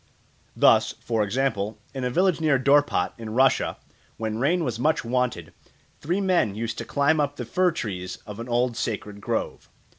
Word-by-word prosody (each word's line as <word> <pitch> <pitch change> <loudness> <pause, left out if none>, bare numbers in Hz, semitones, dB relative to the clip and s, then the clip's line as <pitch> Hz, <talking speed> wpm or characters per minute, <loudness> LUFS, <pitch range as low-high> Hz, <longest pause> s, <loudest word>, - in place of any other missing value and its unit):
Thus, - - +4
for 115 -2 -2
example, 105 -1 -1 0.2
in 135 -2 -4
a 125 - 0
village 180 +4 +2
near 150 -3 +3
Dorpat, 140 -8 +2
in 110 -1 -6
Russia, 130 +1 +3 0.4
when 110 0 -3
rain 170 +7 +2
was 120 -5 -3
much 155 -1 +1
wanted, 125 0 -1 0.5
three 175 +6 -1
men 180 - +1
used 115 +1 -4
to - - -5
climb 145 +2 +2
up 145 -1 0
the 125 - -5
fir 180 +10 +2
trees 90 - -5
of 105 +1 -8
an 120 +1 -6
old 120 0 +1
sacred 105 -2 -4
grove. - - -3
125 Hz, 175 wpm, -25 LUFS, 110-145 Hz, 0.5 s, Thus